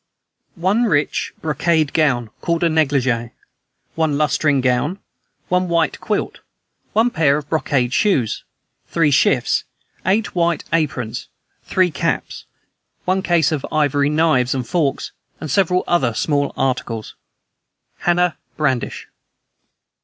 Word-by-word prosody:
one 195 +7 +1
rich 150 -8 0
brocade 155 0 +1
gown, 125 -8 +1
called 170 0 0
a 170 - +4
negligee, 135 -7 +1 0.6
one 160 -3 0
lutestring 150 -1 +2
gown, 130 +8 +1 0.5
one 180 0 +1
white 170 -1 +1
quilt, - - -2 0.5
one 230 +3 +3
pair 150 -6 +3
of 150 -1 -6
brocade 135 -6 0
shoes, 140 - +1 0.4
three 165 -3 +2
shifts, 130 -2 +2 0.4
eight 210 +3 +1
white 170 -3 +1
aprons, 135 -8 -1 0.4
three 185 -2 +2
caps, - - -2 0.6
one 185 +1 +1
case 170 -4 +2
of 150 -4 -2
ivory 145 -2 +2
knives 150 -5 +2
and 125 -3 -3
forks, 150 -3 -1 0.3
and 155 - -5
several 180 +1 +2
other 130 -10 +1
small 145 +1 0
articles. 120 -4 -2 0.9
"HANNAH 175 0 +2 0.2
BRADISH." 130 -5 -1
155 Hz, 115 wpm, -19 LUFS, 135-170 Hz, 0.9 s, a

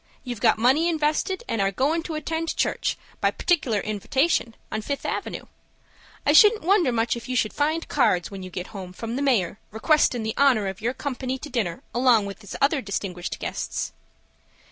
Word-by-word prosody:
You've 245 -4 -6
got - - +4
money 265 +9 +3
invested, 315 +6 0
and 225 - -1
are 195 - +3
goin' 290 - +1
to 325 -1 -5
attend 320 +2 -3
church, - - 0 0.2
by - - +3
partic'lar 260 - +1
invitation, 230 - 0 0.2
on 215 - -2
Fifth 280 +6 -4
Avenue. - - -3 0.8
I 290 - +4
shouldn't 420 +5 +7
wonder 360 -6 +3
much 230 0 +1
if 235 +1 -8
you 255 - -1
should 215 -3 +1
find 310 +3 0
cards, 215 -11 +2
when 195 -1 -7
you 185 - -7
get 180 0 -7
home, 185 -3 -7
from 230 +4 -5
the 275 - -2
Mayor, 220 -9 +1
requestin' 245 0 +2
the 220 0 -2
honor 260 -7 +4
of 190 0 -5
your 240 +4 -1
company 260 -2 -3
to 295 +2 -9
dinner, 205 -9 -2
along 240 -4 +4
with 200 +2 -8 0.2
other 280 0 +2
distinguished 190 -4 -4
guests." - - -4
250 Hz, 185 wpm, -24 LUFS, 215-300 Hz, 0.8 s, shouldn't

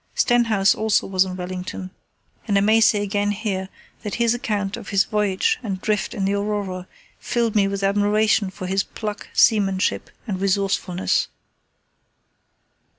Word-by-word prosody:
Stenhouse 225 -5 +3
also 215 -1 +1
was 190 -1 +2
in 185 -1 -5
Wellington, 185 0 -6 0.6
and 200 -2 +2
I - - +4
may 220 +2 +4
say 210 -1 +4
again 205 0 0
here 195 -2 -3 0.3
that 210 -3 -4
his 235 -1 +2
account 205 -4 -2
of - - -9
his 200 -2 +3
voyage 210 - 0
and 195 -5 -4
drift 210 0 -1
in 195 - -1
the 195 - +1
Aurora 200 -3 -3 0.3
filled 235 -2 -1
me 200 -2 +4
with 195 0 -3
admiration 205 +1 +2
for 185 0 -8
his 190 +1 +1
pluck, 210 +1 -6
seamanship, 195 -4 +2 0.2
and 195 -5 -4
resourcefulness. 195 -2 0
200 Hz, 150 wpm, -22 LUFS, 190-215 Hz, 0.6 s, I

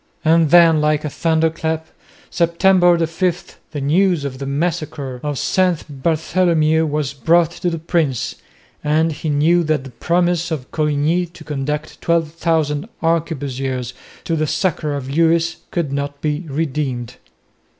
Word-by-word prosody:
And 160 0 +4
then 165 -2 +6
like 150 0 +1
a 150 - -3
thunderclap, 160 0 0 0.5
September 175 +1 +4
5, 175 +2 -3
the 145 -2 -5
news 170 +2 +2
of 130 -2 -5
the 135 - -4
massacre 145 -3 -3
of 145 -2 -3
St 165 -7 0
Bartholomew 160 0 +2
was 145 -2 -2
brought 165 +5 +3
to 175 +1 -2
the 165 - -3
prince, 155 -6 -1 0.5
and 155 +2 +2
he 155 +1 -4
knew 160 +4 +3
that 155 -3 0
the 135 - -10
promise 175 +6 0
of 145 -5 -5
Coligny 155 +3 +1
to 170 - -14
conduct 150 +1 -4
12,000 165 0 0
arquebusiers 135 -6 -1 0.3
to 165 - -1
the 155 -1 0
succour 155 -4 -1
of 135 -2 -5
Lewis 165 +3 +2
could 165 -6 -2
not 140 0 -3
be 150 +3 -2
redeemed. 135 -5 -3
155 Hz, 140 wpm, -19 LUFS, 145-170 Hz, 0.5 s, then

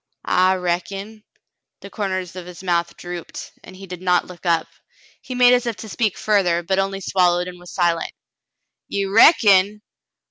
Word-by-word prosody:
"I 185 +1 +3
reckon." 195 +4 -4 0.6
The - - -11
corners 185 -4 -4
of 180 -1 -8
his 180 0 -11
mouth 170 -2 -1
drooped, 175 -1 -8
and 185 - -13
he 195 +1 -11
did 180 -1 -9
not 180 -1 +2
look 180 0 -10
up. 165 -1 +2 0.6
He 255 - -7
made 250 0 +6
as 245 -1 +1
if 230 - -2
to 220 - -10
speak 215 -2 -1
further, 180 -5 +1
but 190 +3 0
only 195 0 -2
swallowed 180 -2 +1
and 180 -1 -9
was 180 -1 -12
silent. 170 -3 0 0.8
*'Ye 200 0 -2
reckon.'' 205 - +5
185 Hz, 170 wpm, -21 LUFS, 175-200 Hz, 0.8 s, made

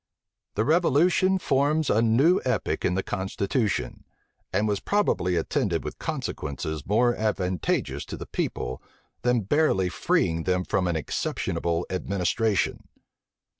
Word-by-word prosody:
The 110 - +1
revolution 175 +4 +3
forms 150 -1 +1
a 110 - +3
new 130 +11 +4
epoch 125 - -1
in 90 - +1
the 95 - 0
constitution; 100 +3 -2 0.5
and 110 - +1
was 100 -2 0
probably 145 - +1
attended - - 0
with - - -6
consequences 75 +1 -4
more 120 +4 +3
advantageous 90 -9 -1
to - - -7
the - - -7
people, 65 - -3 0.4
than 125 -1 +2
barely 100 - +2
freeing 80 -1 0
them 90 0 +1
from 90 0 0
an 85 - 0
exceptionable 85 +2 -2
administration. 100 +3 0
105 Hz, 125 wpm, -26 LUFS, 90-135 Hz, 0.5 s, new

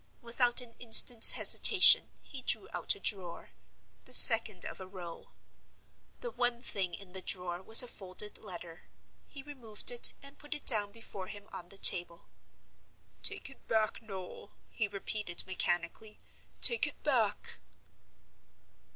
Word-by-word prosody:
Without 240 +1 -1
an 240 -2 -14
instant's 235 0 +6
hesitation, 385 -3 +4
he - - -12
drew - - -3
out - - -2
a - - -17
drawer, 190 - -6 0.5
the 255 - -9
second 225 -7 +5
of - - -10
a 190 - -10
row. 180 -3 -13 0.9
The 485 - -9
one 245 - -5
thing 185 -7 -6
in 190 -2 -16
the 190 - -6
drawer 180 -1 -5
was 220 +5 +4
a - - -11
folded 200 -1 -8
letter. 175 -4 -12 0.4
He 275 - -14
removed 245 -8 -3
it, 240 - +5
and 280 +1 -15
put 295 0 -10
it 295 - -11
down 210 -4 +2
before 200 -4 -12
him 205 0 -14
on 175 -1 -12
the 195 - -10
table. 175 -3 +3 1.0
"Take 395 - -1
it 270 - -20
back, 220 0 -4
Noel!" 195 -2 -13 0.2
he 220 - -5
repeated, 200 -2 -5
mechanically; 185 +3 -6 0.4
"take 470 - +4
it - - -13
back!" - - -4
210 Hz, 145 wpm, -28 LUFS, 185-240 Hz, 1.0 s, instant's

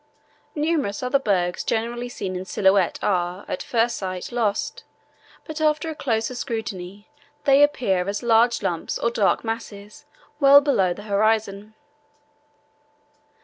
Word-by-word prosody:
Numerous 295 -9 -1
other 250 +2 +2
bergs 180 -7 0
generally 240 +2 -2
seen 190 -6 -5
in 180 - -4
silhouette 190 -1 +2
are, 180 0 -1
at - - -4
first 235 0 0
sight, 185 +1 -5
lost, 235 - -2 0.6
but 315 -1 -6
after 310 +1 +1
a - - -7
closer 230 -4 -1
scrutiny 205 -5 -5 0.4
they 275 0 +5
appear 200 -11 +2
as 205 +4 -3
large 235 0 +3
lumps 165 -2 -2
or 235 - 0
dark 205 -4 +1
masses 225 +3 -7 0.3
well 280 -1 +8
below 260 -11 +1
the 205 +4 -6
horizon. 215 0 0
220 Hz, 130 wpm, -23 LUFS, 195-250 Hz, 0.6 s, well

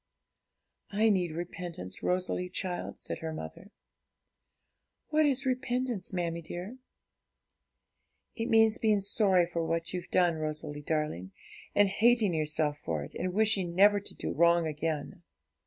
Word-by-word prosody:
'I 215 +2 +3
need 180 -5 +1
repentance, 170 - -6
Rosalie, 180 0 -1
child,' 180 -1 -4
said - - -5
her 160 0 -4
mother. 155 - -8 1.4
'What 310 0 +3
is 270 -1 +1
repentance, 250 -4 -1
mammie 170 -2 -2
dear?' 180 +9 -7 1.6
'It 230 0 -2
means 225 0 +4
being 215 -2 +3
sorry 195 -3 +3
for 170 -1 -3
what 165 +1 -2
you've 180 -1 -5
done, 175 -3 +3
Rosalie 155 -1 -4
darling, 150 - -2 0.4
and 205 0 +5
hating 220 -1 +3
yourself 155 -1 0
for 80 -3 -3
it, 75 - -10
and 185 - -2
wishing 195 -4 +1
never 205 +2 +6
to 200 - -7
do - - -4
wrong 170 0 +4
again.' 155 +1 -3
180 Hz, 135 wpm, -30 LUFS, 160-210 Hz, 1.6 s, never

